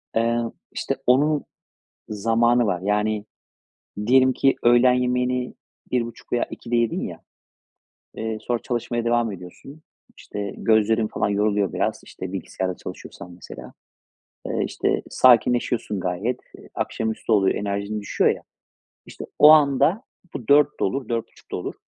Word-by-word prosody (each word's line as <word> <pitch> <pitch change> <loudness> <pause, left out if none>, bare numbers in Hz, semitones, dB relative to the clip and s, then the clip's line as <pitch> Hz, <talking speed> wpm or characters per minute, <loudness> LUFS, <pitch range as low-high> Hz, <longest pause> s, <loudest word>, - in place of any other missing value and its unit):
Eee, 115 +1 +1 0.3
işte, - - -3
onun 145 +4 +3 0.7
zamanı 115 +3 +2
var. 90 -4 -1
Yani, 105 +1 0 0.8
diyelim 130 +1 +5
ki 135 - +2
öğlen 120 +1 +5
yemeğini 125 0 0 0.4
13.30 120 -2 -3
veya 120 - +1
14:00'te 120 0 -4
yedin 115 -1 +1
ya, - - -6 0.9
eee, 110 -1 -4
sonra 120 +2 -1
çalışmaya 120 -1 -3
devam 120 -2 +1
ediyorsun. 95 - -12 0.3
İşte, 100 -1 -6
gözlerin 110 0 +2
falan - - -1
yoruluyor 100 -1 +1
biraz. - - -1
İşte, 95 0 -8
bilgisayarda 95 0 -4
çalışıyorsan 90 - -10
mesela. 90 - -11 0.8
Iıı, - - -1
işte, - - -1
sakinleşiyorsun 120 -4 +3
gayet. 100 +8 -2 0.2
Eee, - - -16
akşamüstü 110 +1 -3
oluyor, 100 -3 +3
enerjin 100 +1 -3
düşüyor 100 - +1
ya. - - -7 0.6
İşte, - - -9
o 150 - +9
anda 150 - +4 0.3
bu 115 - -7
16:00'da 145 0 +4
olur, 135 0 -2
16:30'da 115 -1 -5
olur. - - -5
115 Hz, 130 wpm, -23 LUFS, 105-125 Hz, 0.9 s, o